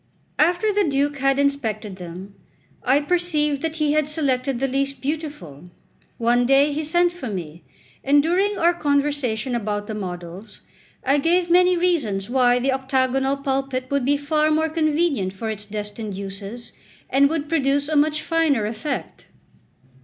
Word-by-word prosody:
After 355 +7 +2
the 410 0 +2
Duke 285 -1 0
had 275 0 +2
inspected 225 -8 -1
them, 180 +2 -9 0.5
I 265 +3 +3
perceived 300 -3 0
that 320 -1 -2
he 305 -2 +1
had 305 -1 +1
selected 275 -4 -1
the 270 - +1
least 275 +1 -2
beautiful. 275 - -5 0.5
One 240 +1 +2
day 280 +2 +4
he 305 - -2
sent 345 +3 +2
for 325 -9 -6
me, 170 -4 -6 0.4
and 285 +1 +4
during 385 +5 +1
our 340 +1 +3
conversation 285 -6 0
about 205 -3 -2
the 215 - -5
models, 185 +1 -7 0.4
I 275 +2 +2
gave 345 +3 +1
many 360 0 +5
reasons 240 - 0
why 245 -1 +4
the 260 +2 +1
octagonal 265 +1 0
pulpit 270 -1 -2
would 280 -2 +1
be 285 +3 +2
far 305 +2 +1
more 315 +1 +1
convenient 310 - 0
for 220 +3 -4
its 210 -1 -5
destined 210 0 -5
uses, 200 +4 -7 0.4
and 280 +1 +4
would 310 -2 -2
produce 285 -2 +1
a 310 - -1
much 305 +1 +2
finer 320 -9 +1
effect. 225 +7 -5
275 Hz, 155 wpm, -22 LUFS, 225-305 Hz, 0.5 s, many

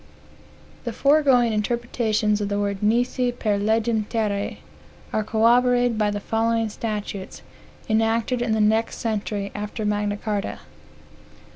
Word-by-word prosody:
The 235 - -4
foregoing 270 -4 +4
interpretations 215 -1 0
of 200 - -2
the 205 - -1
words 200 -1 -2
nisi 245 +3 +1
per 215 -4 -1
legem 220 +1 +1
terrae 210 -3 -1 0.6
are 215 - +1
corroborated 245 +2 +3
by 210 -1 +2
the 205 0 -2
following 225 +1 0
statutes, 210 -3 -5 0.4
enacted 225 +2 +1
in 235 -2 0
the 220 - +2
next 220 +2 +2
century 210 -3 -3
after 210 +1 -4
Magna 205 0 0
Carta. 205 -1 -3
220 Hz, 125 wpm, -23 LUFS, 210-235 Hz, 0.6 s, foregoing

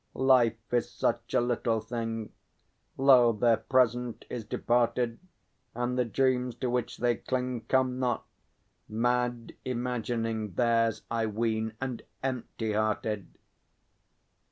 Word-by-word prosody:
Life 120 -3 +3
is 120 -1 +2
such - - -1
a - - +6
little 120 -2 0
thing; 115 -1 -4 0.7
Lo, 130 -3 +6
their 115 +1 +3
present 125 -2 +1
is 120 -2 -3
departed, 120 +1 0 0.6
And 120 +1 -1
the 125 -1 +2
dreams 125 0 +1
to 125 -2 -2
which 125 -1 -1
they 120 -2 +1
cling 125 -2 -2
Come 130 -1 +2
not. 125 -2 0 0.6
Mad 120 +1 0
imagining 115 -4 -2
Theirs, 115 +1 +2
I 115 -1 +1
ween, 110 0 -1
and 130 -3 -3 0.2
empty 120 -4 -2
hearted! 110 -1 -1
120 Hz, 115 wpm, -29 LUFS, 115-125 Hz, 0.7 s, a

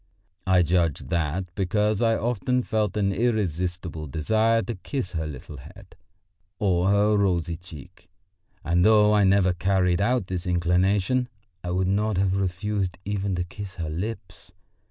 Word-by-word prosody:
I 90 -1 +4
judge 85 -3 +1
that 85 +1 -2
because 105 +3 0
I 115 -1 +3
often 125 +2 0
felt 105 -3 -1
an 100 -1 +1
irresistible 90 -7 -2
desire 110 +10 +1
to 110 - -4
kiss 95 0 -5
her 80 -3 -3
little 70 0 -9
head 65 - -14 0.6
or 95 -2 +1
her 105 +1 +3
rosy 90 -4 +1
cheek. 80 -4 -14 0.5
And 85 +3 +2
though 105 0 +5
I 105 -1 +4
never 95 -1 +3
carried 90 0 +1
out 120 0 +1
this 90 0 -4
inclination, 95 +8 +1 0.3
I 90 - -4
would 90 +1 0
not 105 +1 0
have 95 0 +1
refused 95 0 -2
even 100 -1 -2
to 90 - -1
kiss 100 +2 -9
her 80 -4 -4
lips. 90 -1 -6
95 Hz, 150 wpm, -25 LUFS, 90-105 Hz, 0.6 s, though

